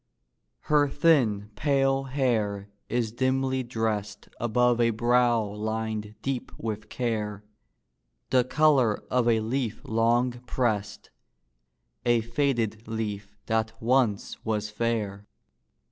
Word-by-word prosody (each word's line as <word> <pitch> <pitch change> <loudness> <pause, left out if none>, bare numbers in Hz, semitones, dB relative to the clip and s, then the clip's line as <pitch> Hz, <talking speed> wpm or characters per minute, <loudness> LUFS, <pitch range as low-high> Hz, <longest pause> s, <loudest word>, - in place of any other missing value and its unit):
Her 145 -1 +3
thin, 115 -11 +2
pale 135 -1 +1
hair 110 -7 -1 0.2
is 120 -2 0
dimly 130 +2 0
dressed 110 -4 -3
Above 120 +1 +2
a 115 - +4
brow 120 0 +3
lined 110 0 -4
deep 135 -2 -3
with 110 -1 -5
care, 105 -4 -2 0.9
The 125 -1 +5
color 135 -5 +3
of 125 -2 +2
a 115 -2 +3
leaf 120 0 -2
long 115 +3 +2 0.2
pressed, 105 -5 -2 0.9
A 120 -1 +3
faded 115 -3 -1
leaf 105 -2 -4
that 110 0 -1
once 120 -4 +1
was 105 -1 -2
fair. 105 -3 -2
115 Hz, 105 wpm, -27 LUFS, 105-125 Hz, 0.9 s, The